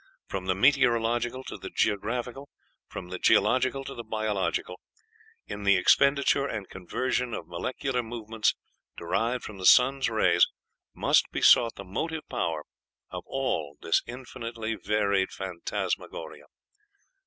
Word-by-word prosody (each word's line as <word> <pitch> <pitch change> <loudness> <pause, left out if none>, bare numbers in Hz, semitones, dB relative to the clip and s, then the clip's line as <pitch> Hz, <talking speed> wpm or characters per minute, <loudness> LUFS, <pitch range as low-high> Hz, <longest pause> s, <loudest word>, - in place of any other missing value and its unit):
From 95 -1 -5
the 95 - +2
meteorological 120 0 +2
to - - -8
the - - -7
geographical, 120 +6 -2 0.4
from 90 - -8
the 90 0 -5
geological 130 +5 +3
to 135 - -7
the 120 - -7
biological, 105 -4 -2 0.7
in 105 - -7
the 100 -1 +4
expenditure 140 +7 +3
and 105 -7 -5
conversion 125 +6 -2
of - - -7
molecular 125 +8 -2
movements, 115 -1 -1 0.4
derived 115 +8 -1
from 100 -2 -8
the 95 - -4
sun's 135 +1 +5
rays, 90 -6 +4 0.5
must - - +3
be - - -4
sought 115 -2 +6
the 100 - -8
motive 155 - -4
power 80 - -2 0.5
of - - -5
all 80 - -2
this 80 - +2
infinitely 115 -2 -5
varied 100 -2 0
phantasmagoria." 95 -3 -5
115 Hz, 130 wpm, -27 LUFS, 95-125 Hz, 0.7 s, sought